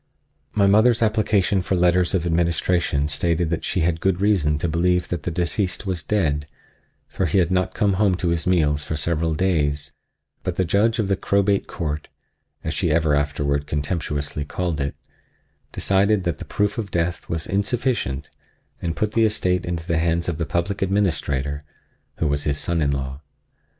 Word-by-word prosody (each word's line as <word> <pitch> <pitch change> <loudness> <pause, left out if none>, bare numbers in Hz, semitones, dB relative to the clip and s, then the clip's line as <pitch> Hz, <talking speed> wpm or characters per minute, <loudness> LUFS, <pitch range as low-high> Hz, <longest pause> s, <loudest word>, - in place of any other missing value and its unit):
My 100 - +4
mother's 110 +4 +4
application 105 -3 +2
for 95 - -1
letters 90 +1 +3
of 90 -2 0
administration 85 -3 +1
stated 80 +2 0
that 85 - -1
she 90 - -1
had 80 0 +1
good 95 -2 +1
reason 95 -8 +2
to 80 - -1
believe 90 +2 +1
that 90 -3 -2
the 80 - -3
deceased 90 +4 -1
was 90 -4 -2
dead, 75 -4 0 0.6
for 95 - -1
he 80 - +1
had 90 -1 +3
not 90 0 0
come 105 -3 +2
home 100 -3 +4
to 90 -1 -1
his 85 -1 0
meals 75 -5 +2
for 80 - -3
several 80 +1 0
days; 75 -5 0 0.5
but 90 - -3
the 95 - +1
Judge 110 +7 +2
of 110 -4 0
the 100 - +2
Crowbait 100 +1 +1
Court—as 80 0 -7
she 85 +2 0
ever 80 -1 +2
afterward 70 0 0
contemptuously 75 -1 -2
called 85 0 -2
it—decided 95 +7 -2
that 85 -5 -2
the - - -7
proof 105 +2 -1
of 105 -3 -3
death 85 0 -2
was 80 -1 -1
insufficient, 100 - -1 0.5
and 85 -1 -2
put 105 -1 0
the 115 +1 +2
estate 90 -5 0
into 85 -2 -3
the 85 -2 0
hands 85 +1 0
of 85 -2 -2
the 85 - -1
Public 85 +6 -1
Administrator, 80 -8 0 0.5
who 80 - 0
was 70 0 0
his 70 -1 0
son 85 +1 -1
in 70 - +2
law. 70 0 -3
85 Hz, 175 wpm, -22 LUFS, 75-95 Hz, 0.6 s, My